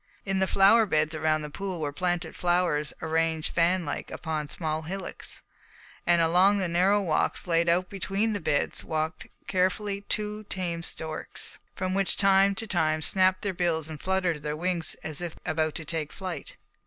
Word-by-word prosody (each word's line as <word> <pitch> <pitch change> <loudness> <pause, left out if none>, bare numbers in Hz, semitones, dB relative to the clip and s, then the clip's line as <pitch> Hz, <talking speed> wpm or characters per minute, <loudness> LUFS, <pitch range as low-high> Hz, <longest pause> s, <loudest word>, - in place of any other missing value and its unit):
In 195 -1 0
the 190 - +2
flower 210 +4 +5
beds 155 -2 +1
around 155 0 +1
the 150 - -6
pool 190 0 -4
were 150 -2 -2
planted 175 0 -1
flowers 175 -4 +1
arranged 160 0 0
fanlike 170 -3 +1
upon 155 -2 -3
small 155 +1 -3
hillocks, 190 +5 -5 0.6
and 175 0 +5
along 180 +5 +4
the 190 -2 0
narrow 185 +4 +3
walks 170 -6 0
laid 170 -1 +2
out 180 +2 +2
between 200 +3 -1
the 205 - -1
beds 145 -3 0
walked 160 +1 -3 0.2
carefully 195 +2 0
two 210 0 -2
tame 175 -4 -3
storks, 160 -1 -4 0.2
which 185 +1 +1
from - - -16
time 195 0 +5
to 225 +2 -3
time 160 -6 +1
snapped 185 +1 +3
their 200 -2 -1
bills 170 -3 0
and 155 -2 -8
fluttered 185 -5 0
their 150 +1 -3
wings 175 -1 0
as 155 +1 -1
if 170 -2 -4
about 155 -1 0
to 160 - -4
take 155 -1 -3
flight. 185 -2 -6
175 Hz, 170 wpm, -27 LUFS, 160-190 Hz, 0.6 s, flower